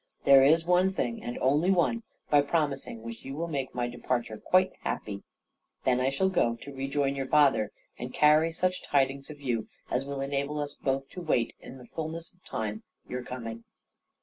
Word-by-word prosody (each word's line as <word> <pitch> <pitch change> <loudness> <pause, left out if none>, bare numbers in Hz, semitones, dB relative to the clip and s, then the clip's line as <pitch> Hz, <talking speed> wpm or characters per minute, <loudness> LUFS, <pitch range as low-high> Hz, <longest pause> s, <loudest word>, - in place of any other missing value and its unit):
There 140 -1 +8
is 160 +4 +5
one 180 +2 +4
thing, 120 -10 -2
and 120 - -5
only 145 +7 +3
one, 195 +5 +3 0.3
by 145 -1 +7
promising 140 -6 -1
which 115 0 -7
you 135 +1 -6
will 165 +3 -2
make 135 -6 -3
my 120 -1 0
departure 120 -2 -2
quite 185 +1 +3
happy. 100 -1 -3 0.6
Then 125 -1 +3
I 130 - +3
shall 140 +8 +1
go 120 -11 +2
to 140 +4 -10
rejoin 135 +1 0
your 135 -1 -3
father, 140 -8 +4 0.3
and 125 +1 -5
carry 155 +3 +5
such 185 +2 0
tidings 135 0 +1
of 150 -1 -9
you, 120 -5 -2 0.2
as 125 - +1
will 140 0 -4
enable 140 +2 -1
us 145 -1 -3
both 135 0 -1
to 180 - -8
wait, 130 -8 +1
in 135 - -10
the 125 - -12
fulness 160 +6 -5
of 180 - -33
time, 110 -1 -4 0.3
your 125 0 -4
coming." 115 -2 -6
140 Hz, 190 wpm, -29 LUFS, 125-155 Hz, 0.6 s, There